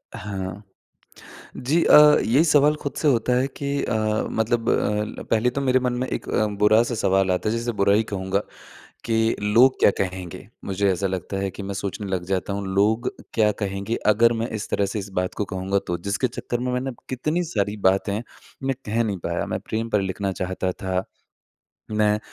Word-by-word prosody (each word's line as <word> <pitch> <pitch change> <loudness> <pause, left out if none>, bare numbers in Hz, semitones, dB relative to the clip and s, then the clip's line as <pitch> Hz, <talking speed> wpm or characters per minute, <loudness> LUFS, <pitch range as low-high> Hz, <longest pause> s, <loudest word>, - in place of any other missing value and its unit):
हाँ, 95 -1 -5 0.9
जी, 155 +7 +1
अ, 150 0 +8
ये 130 +8 +4
सवाल 150 -2 +4
खुद 140 - -3
से 155 - +1
होता 125 -2 +2
है 130 +2 +2
कि 140 0 -2
अ, - - -2 0.4
मतलब 115 +1 0
अ, 105 0 +1
ल - - -8
पहले 115 +2 +3
तो 140 +3 -3
मेरे 130 -1 +3
मन 125 -1 0
में 130 - -1
एक - - -4
अ, 110 - +1
बुरा-सा 110 +4 +4
सवाल 95 -3 +2
आता 90 +3 0
है 110 - 0
जिसे 120 +1 -2
बुरा 100 0 +4
ही 110 - +3
कहूँगा, 95 0 0 0.7
कि 115 0 +1
लोग 115 +6 +4
क्या - - +6
कहेंगे? 95 -1 -4 0.2
मुझे 100 0 +1
ऐसा 95 +2 -1
लगता 95 +1 -4
है 95 0 -1
कि 100 - -8
मैं 100 0 -5
सोचने 100 +1 -4
लग 90 -2 -2
जाता 95 +1 -1
हूँ 100 0 -3
लोग 110 +5 +2 0.2
क्या 110 -2 +4
कहेंगे 100 +3 -3
अगर 115 +3 +5
मैं 115 - -2
इस - - -6
तरह 100 - +1
से 100 +2 -4
इस 100 - -5
बात 90 - -3
को 105 - -1
कहूँगा 95 +2 0
तो 85 -1 -2
जिसके 105 +6 +1
चक्कर 120 0 -4
में 125 0 -2
मैंने 130 +2 -1 0.2
कितनी 150 +7 -1
सारी 105 0 0
बातें 100 +2 -1 0.4
मैं 135 0 0
कह 110 +2 +1
नहीं 105 -4 -2
पाया - - -2
मैं - - -3
प्रेम 110 +1 -3
पर 105 - +2
लिखना 95 0 -2
चाहता 95 0 -2
था, 95 0 -2 0.9
मैं 105 0 +2
105 Hz, 200 wpm, -23 LUFS, 95-120 Hz, 0.9 s, अ